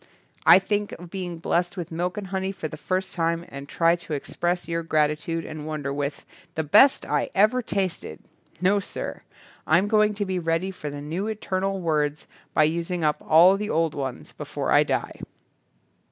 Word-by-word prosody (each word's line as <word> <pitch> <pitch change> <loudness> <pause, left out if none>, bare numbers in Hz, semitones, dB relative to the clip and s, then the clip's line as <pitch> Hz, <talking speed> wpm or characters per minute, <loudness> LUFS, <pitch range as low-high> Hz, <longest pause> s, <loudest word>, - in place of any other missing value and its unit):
Think 205 +1 -1
of 175 0 -10
being 180 -3 -4
blessed 175 +3 -1
with 170 -3 -5
milk 175 +4 -2
and 205 - -4
honey 190 0 -2
for 175 -5 -5
the 155 - -8
first 185 +4 -2
time 170 0 -1
and 140 +1 -9
trying 170 +1 +3
to 170 -2 -7
express 175 +4 -2
your 170 0 -1
gratitude 155 +1 0
and 155 -1 -7
wonder 145 -3 -3
with. 140 0 -3 0.3
The 160 - 0
best 265 - +5
I - - 0
ever 215 +6 +4
tasted'. 190 - -3 0.4
No 190 +3 +3
sir. 195 - -6 0.5
I'm 175 +6 +4
going 215 -1 +3
to 205 0 -2
be 185 -1 -1
ready 165 +3 0
for 150 -5 -6
the 145 0 -7
new 165 +8 -3
eternal 195 -2 -2
words 150 -3 0 0.3
by 155 - +5
using 170 +2 -1
up 150 -1 +2
all 175 +5 +6
the 210 +1 -4
old 165 -1 +1
ones 135 -3 -5
before - - -4
I - - +6
die." - - -2
170 Hz, 180 wpm, -25 LUFS, 155-190 Hz, 0.5 s, all